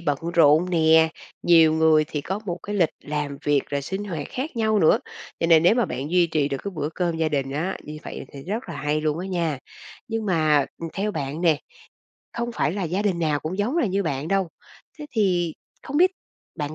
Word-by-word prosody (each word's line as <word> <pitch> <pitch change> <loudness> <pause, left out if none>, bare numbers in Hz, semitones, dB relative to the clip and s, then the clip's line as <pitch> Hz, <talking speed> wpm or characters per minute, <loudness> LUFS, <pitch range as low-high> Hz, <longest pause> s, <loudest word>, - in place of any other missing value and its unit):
bận 145 -5 0 0.2
rộn 160 +2 +5
nè, 160 -1 +5 0.3
nhiều 165 -2 +6
người 160 -1 +4
thì 150 -1 -4
có 190 +7 -3
một 175 -1 -3
cái 205 - -5
lịch 175 -5 +4 0.2
làm 145 -1 -3
việc 145 -2 +3
rồi 140 -1 -1
sinh 190 +8 -4
hoạt 165 -7 -5
khác 260 0 -5
nhau 220 -2 +2
nữa. 160 - +5 0.4
Cho 165 - +2
nên 165 -1 +6
nếu 180 +6 +5
mà 240 -3 +2
bạn 145 -3 -4
duy 180 -1 +4
trì 155 -3 0
được 135 -1 -3
cái 200 - -2
bữa 150 -1 -2
cơm 175 -2 -1
gia 160 -1 +1
đình 140 -3 -1
á, 165 +7 -2
như 150 0 -8
vậy - - -7
thì 140 -1 -9
rất 215 +7 -4
là - - -5
hay 150 +1 -1
luôn 155 +1 -1
á 185 - -4
nha! 170 -7 -1 0.5
Nhưng 225 -1 -2
mà, 155 -6 +3
ừm, 165 - -4
theo 205 +2 -1
bạn 145 -2 -4
nè, 165 -4 +4 0.8
không 235 0 -3
phải 160 - 0
là 200 - -3
gia 180 +4 -1
đình 190 -5 0
nào 150 -3 0
cũng 175 +5 -4
giống 235 +10 0
là 330 -9 +2
như 200 +1 0
bạn 145 -1 -3
đâu, 195 -3 +1 0.5
thế 300 - -7
thì 180 -7 +1 0.3
không 285 - -4
biết 365 +3 +5 0.5
bạn 150 -1 -4
165 Hz, 230 wpm, -24 LUFS, 150-195 Hz, 0.8 s, nhiều